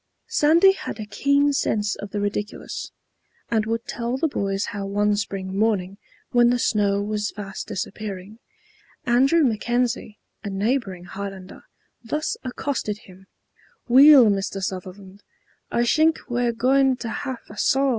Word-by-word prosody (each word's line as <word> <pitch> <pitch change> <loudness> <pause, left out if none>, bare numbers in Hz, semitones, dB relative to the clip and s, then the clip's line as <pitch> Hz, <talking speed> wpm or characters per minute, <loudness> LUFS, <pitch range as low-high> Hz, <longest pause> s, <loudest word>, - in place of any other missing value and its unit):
Sandy 330 +6 +5
had 385 - -6
a 215 - -4
keen 280 +6 +2
sense 210 -6 0
of 200 - -7
the 205 - -3
ridiculous, 205 +1 -4 0.6
and 220 -2 +1
would 230 +1 -2
tell 240 +2 -3
the 320 - +1
boys 195 -8 -2
how 200 -1 -4
one 205 +1 +1
spring 195 -2 -4
morning 200 -2 0 0.3
when 240 -1 +5
the 245 - +2
snow 200 -3 +1
was 210 0 -2
fast 195 -2 -7
disappearing, 200 +2 -6 0.7
Andrew 270 +7 +4
McKenzie, 240 -2 -1 0.3
a 205 - -4
neighboring 195 -2 -1
Highlander, 195 0 -8 0.4
thus 300 +7 -2
accosted 255 -4 -3
him, 190 +1 -16 0.6
"Weel, 270 +1 +8
Mr. 195 0 -2
Suzzerland, 190 +1 -6 0.5
I 235 - +1
shink 315 +6 +3
we're 245 -1 0
goin' 260 +3 +2
to 235 - -5
have 260 0 -4
a 205 - -12
saw." 275 +1 +3
215 Hz, 140 wpm, -23 LUFS, 200-255 Hz, 0.7 s, Weel